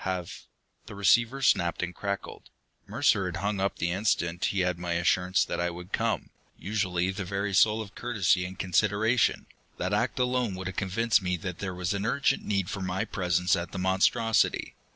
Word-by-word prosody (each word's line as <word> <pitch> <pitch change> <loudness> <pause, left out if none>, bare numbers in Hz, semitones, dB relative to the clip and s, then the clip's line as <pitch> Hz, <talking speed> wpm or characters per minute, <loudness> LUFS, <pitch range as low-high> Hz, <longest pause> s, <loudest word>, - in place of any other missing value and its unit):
"Have 90 -2 -4 0.2
" - - -44
The - - -9
receiver 115 +7 +3
snapped 85 -7 +2
and 90 0 -3
crackled; 100 +2 -5 0.4
Mercer - - +2
had - - -4
hung 100 0 -2
up 100 +1 0
the 85 +1 -1
instant 90 -3 0
he 100 - 0
had 90 -1 0
my 90 -1 -2
assurance 90 +2 +2
that - - -4
I 90 - 0
would 90 +1 -10
come. - - -1 0.3
Usually 95 -3 -1
the 95 +1 -4
very 100 +2 -3
soul 110 +3 +4
of 100 0 -14
courtesy 100 -7 +1
and 90 +1 -7
consideration, 105 +5 +1 0.3
that - - -2
act - - 0
alone 125 -5 0
would 95 0 -6
have 95 0 -5
convinced 105 +4 +1
me 90 -1 -1
that 90 -2 -4
there 95 -2 -4
was 90 +1 -2
an 100 +2 -2
urgent 135 +2 +1
need 100 -3 -1
for 95 +1 -5
my 95 0 -2
presence 90 -1 +1
at 85 0 -5
The - - -4
Monstrosity. 95 +4 +2
95 Hz, 195 wpm, -28 LUFS, 90-105 Hz, 0.4 s, soul